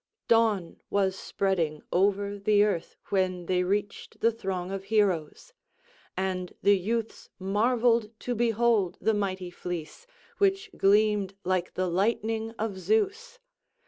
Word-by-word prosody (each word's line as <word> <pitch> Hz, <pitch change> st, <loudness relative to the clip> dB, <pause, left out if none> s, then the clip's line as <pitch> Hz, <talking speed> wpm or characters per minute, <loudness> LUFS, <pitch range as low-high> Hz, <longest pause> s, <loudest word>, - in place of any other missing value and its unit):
Dawn 220 Hz, -6 st, +2 dB
was 195 Hz, -2 st, +1 dB
spreading 175 Hz, -7 st, -1 dB
over 200 Hz, +2 st, +1 dB
the 205 Hz, +1 st, +4 dB
earth 195 Hz, -6 st, -1 dB
when 185 Hz, -2 st, 0 dB
they 180 Hz, +1 st, +1 dB
reached 205 Hz, +2 st, -3 dB
the 230 Hz, -, +3 dB
throng 190 Hz, -4 st, -4 dB
of 195 Hz, 0 st, -5 dB
heroes; 200 Hz, -, 0 dB, 0.6 s
and 185 Hz, -1 st, -2 dB
the 205 Hz, -, +6 dB
youths 225 Hz, +4 st, -3 dB
marvelled 230 Hz, +3 st, +2 dB
to 245 Hz, -, -2 dB
behold 230 Hz, -5 st, +2 dB
the 220 Hz, +3 st, +2 dB
mighty 190 Hz, -3 st, -2 dB
fleece, 175 Hz, -, -6 dB, 0.3 s
which 395 Hz, +1 st, +1 dB
gleamed 205 Hz, -1 st, +3 dB
like 180 Hz, -1 st, -1 dB
the 185 Hz, 0 st, 0 dB
lightning 220 Hz, +4 st, 0 dB
of 210 Hz, -3 st, -3 dB
Zeus. 440 Hz, -, 0 dB
200 Hz, 125 wpm, -28 LUFS, 185-225 Hz, 0.6 s, the